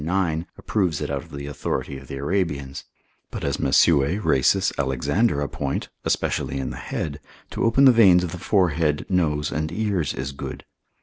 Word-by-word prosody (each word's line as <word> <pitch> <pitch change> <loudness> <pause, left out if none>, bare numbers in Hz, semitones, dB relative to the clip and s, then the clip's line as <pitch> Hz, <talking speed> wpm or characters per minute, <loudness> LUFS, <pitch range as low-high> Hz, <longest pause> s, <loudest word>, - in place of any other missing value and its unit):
9, 85 -1 0
approves 90 -8 -1
it 75 -1 -3
out 70 -1 -2
of 85 - -16
the 70 -2 -7
authority 70 -1 -3
of 70 - -14
the - - -6
Arabians; 70 -3 -2 0.4
but - - -6
as - - -1
Mesue, 80 +3 +3
Rhasis, 95 +9 +2
Alexander 70 - 0
appoint, 70 -1 -3
especially - - -1
in 65 - -3
the - - -7
head, 70 -2 -4 0.3
to - - -2
open 115 +4 +4
the 130 - +9
veins 95 -7 +6
of 85 - -3
the 90 - -7
forehead, 85 -5 +1
nose 75 -6 +1
and 80 +1 -2
ears 95 -6 -1
is 65 +2 -4
good. 70 - -7
80 Hz, 175 wpm, -23 LUFS, 70-90 Hz, 0.4 s, the